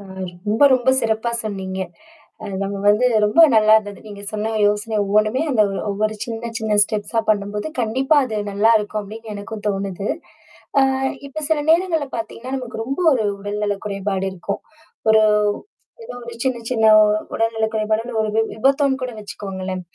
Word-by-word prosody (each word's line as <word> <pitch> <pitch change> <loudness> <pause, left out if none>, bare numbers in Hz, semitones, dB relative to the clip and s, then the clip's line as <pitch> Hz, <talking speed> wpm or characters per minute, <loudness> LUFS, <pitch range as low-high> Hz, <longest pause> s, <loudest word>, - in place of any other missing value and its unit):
அ - - -11 0.5
ரொம்ப, 220 +6 +1
ரொம்ப 255 0 +2
சிறப்பா 225 0 0
சொன்னீங்க. 190 -3 -4 0.6
அ - - -6 0.2
நம்ம 200 0 -3
வந்து 210 +5 +4 0.2
ரொம்ப 210 +9 +3 0.2
நல்லா 215 0 +6
இருந்தது. 205 -2 -3
நீங்க 200 -1 -9
சொன்ன 215 +1 -2
யோசனை 210 +2 0
ஒவ்வொன்னுமே 215 +6 +2
அந்த 230 -6 +4 0.3
ஒவ்வொரு 215 +2 -1
சின்ன, 230 0 -5
சின்ன 220 -2 0
ஸ்டெப்ஸா 215 +2 -2
பண்ணும்போது, 205 +1 -1
கண்டிப்பா 260 +6 +1
அது 220 -4 -4 0.2
நல்லாயிருக்கும் 215 0 +2
அப்பிடின்னு 220 +2 -9
எனக்கும் 205 +1 -7
தோணுது. 195 0 -3 0.7
ஆ - - +5 0.4
இப்ப 280 +3 -8
சில 320 -1 +2
நேரங்கள்ல 330 -3 +2
பார்த்தீங்கன்னா, 230 +3 -6
நமக்கு 250 -3 -5
ரொம்ப 275 +7 -3
ஒரு 240 -5 +1
உடல் 205 +1 -4
நல 205 -1 0
குறைபாடு 195 -1 -2
இருக்கும். 190 +2 -5 0.5
ஒரு 220 - +6 0.8
ஏதோ 450 - -8
ஒரு 235 0 -8
சின்ன, 260 -2 0
சின்ன 225 -3 +1 0.5
உடல்நலக் 225 -1 0
குறைபாடோ! 220 +2 -1
ஒரு 215 - -1
வி 225 - +4
விபத்தோன்னு 270 +3 +2
கூட 255 -1 -3
வச்சிக்கோங்களேன். 190 -3 -6
215 Hz, 155 wpm, -20 LUFS, 205-235 Hz, 0.8 s, நல்லா